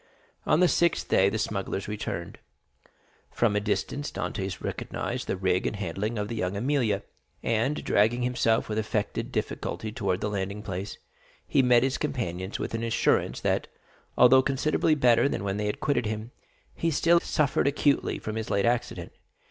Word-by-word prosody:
On 155 - +4
the 180 - +6
sixth 170 0 +1
day, 95 +1 +4
the 110 - -2
smugglers 100 -2 -2
returned. 105 -5 -5 0.9
From 115 -3 +1
a - - +3
distance 115 +7 -2
Dantès 95 -1 -4
recognized - - -4
the - - -1
rig 95 -1 +1
and - - -2
handling 100 +4 -3
of 105 +1 -3
La 115 - -3
Jeune 90 -2 -1
Amélie, 120 -3 0 0.4
and 115 +6 0
dragging 115 +4 +2
himself 120 -2 +1
with 110 0 -1
affected 110 -1 -2
difficulty 110 - -3
towards 95 -4 -1
the - - -1
landing 100 +1 -3
place, 95 -1 -5 0.5
he - - +3
met 125 -2 +5
his 135 +1 0
companions 105 - -3
with - - -4
an 115 - -2
assurance 115 0 +1
that, - - 0 0.5
although 125 +2 +7
considerably 155 +4 +1
better 125 -1 +4
than - - -3
when 100 0 -2
they 105 0 0
quitted 125 -6 0
him, 110 +2 -4 0.4
he 165 - -1
still 170 +2 +4
suffered 145 -4 +1
acutely 140 0 +1
from 110 0 -5
his 110 - -4
late 100 -1 +1
accident. 120 -7 -1
110 Hz, 165 wpm, -27 LUFS, 100-130 Hz, 0.9 s, although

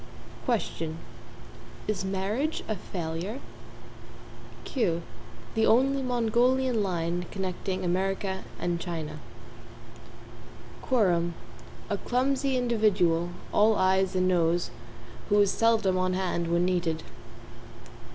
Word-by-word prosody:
=QUESTION= 165 - -1 0.9
Is 210 -3 -1
marriage 200 +11 -1
a 215 - -1
failure? 180 +5 -4 1.3
=QUEUE= 170 - 0 0.5
The 220 0 +2
only 270 +4 +4
Mongolian 245 0 +2
line 175 -2 -1
connecting 190 -1 -3
America 190 +1 -1
and 175 -1 -1
China. 165 -3 -5 1.6
=QUORUM= 175 -9 +2 0.5
A - - -1
clumsy 265 +1 +1
individual, 205 -8 +2 0.2
all 215 +1 +5
Ayes 190 0 +2
and 185 0 +2
Noes, 175 -1 +2 0.6
who 205 0 +4
is 200 -1 +5
seldom 220 -5 +3
on 185 0 +1
hand 180 -2 -1
when 170 +1 +3
needed. 175 -3 0
190 Hz, 95 wpm, -28 LUFS, 175-225 Hz, 1.6 s, all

